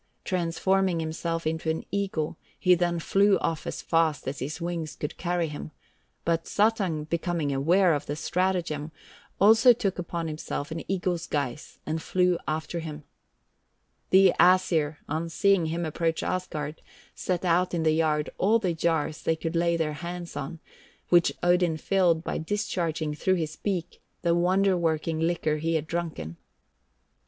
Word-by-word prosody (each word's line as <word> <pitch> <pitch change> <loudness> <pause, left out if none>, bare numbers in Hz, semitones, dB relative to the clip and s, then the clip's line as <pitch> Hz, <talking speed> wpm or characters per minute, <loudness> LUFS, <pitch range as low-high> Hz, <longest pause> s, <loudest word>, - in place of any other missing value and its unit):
Transforming 185 +1 +1
himself 165 +1 -3
into 160 0 -1
an 160 - -2
eagle, 195 -6 -1 0.2
he 180 - +4
then 175 -1 +1
flew 195 +4 +3
off 165 -2 -2
as - - -5
fast 160 -5 +1
as 140 +2 -3
his 150 +6 -4
wings 170 -2 -4
could 150 - -5
carry 175 -1 -1
him, 150 +1 -7 0.6
but 165 0 0
Suttung 200 -7 +1
becoming 165 -3 -1
aware 170 +6 +4
of 145 0 -3
the 145 - -2
stratagem, 165 -3 -1 0.5
also 225 +5 +7
took 195 -5 -2
upon 170 -1 -3
himself 155 -1 -4
an 165 - -3
eagle's 180 -3 -1
guise, 140 -1 -3
and 160 +1 -2
flew 180 0 +1
after 155 +2 -2
him. 155 -2 -7 1.1
The 190 -1 +6
Æsir, 165 -5 +4
on 160 +3 -2
seeing 195 0 +3
him 165 +2 -2
approach 165 +1 -1
Asgard, 160 -4 -3 0.3
set 180 0 -2
out 175 +1 +2
in 165 - 0
the 160 - +4
yard 155 -1 +1
all 215 +4 +4
the 190 -6 -1
jars 160 -1 0
they 160 - +1
could 165 +1 -4
lay 170 0 +2
their 155 -2 -1
hands 175 +2 -6
on, 165 - -5 0.5
which 175 -1 +5
Odin 175 -2 +3
filled 175 -2 +2
by - - -2
discharging 160 -4 -2
through 185 +5 +1
his 155 -3 -3
beak 180 -4 -3 0.2
the 170 -1 +3
wonder 185 +3 +3
working 160 -1 0
liquor 160 -2 0
he 165 +2 -1
had 155 -1 0
drunken. 160 - -4
170 Hz, 155 wpm, -27 LUFS, 155-180 Hz, 1.1 s, also